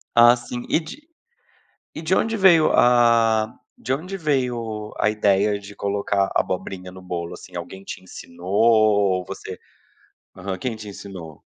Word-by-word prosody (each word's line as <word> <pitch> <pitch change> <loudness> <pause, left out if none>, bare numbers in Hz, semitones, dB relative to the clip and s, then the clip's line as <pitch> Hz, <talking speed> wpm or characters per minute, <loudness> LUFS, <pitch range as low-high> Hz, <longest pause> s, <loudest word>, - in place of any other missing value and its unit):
Ah 120 +1 +8
sim. 120 0 -7
E - - +3
de 230 - -11 0.9
e - - -7
de 165 +3 0
onde 225 0 0
veio, 175 -6 +5
ah, 115 -2 +4 0.2
de 130 - -2
onde 185 +7 -4
veio 120 - -2
a 105 - +3
ideia 105 -1 +2
de 100 0 -11
colocar 100 -1 0
abobrinha 90 0 -2
no 95 0 -12
bolo, 85 -2 -5
assim? 90 - -12
Alguém 95 +2 -7
te - - -8
ensinou 85 0 -11
ou 105 -4 +3
você - - -8 0.8
aham, 95 0 -5
quem 120 +4 -3
te 105 -1 -9
ensinou? 95 -6 -10
105 Hz, 150 wpm, -22 LUFS, 95-120 Hz, 0.9 s, Ah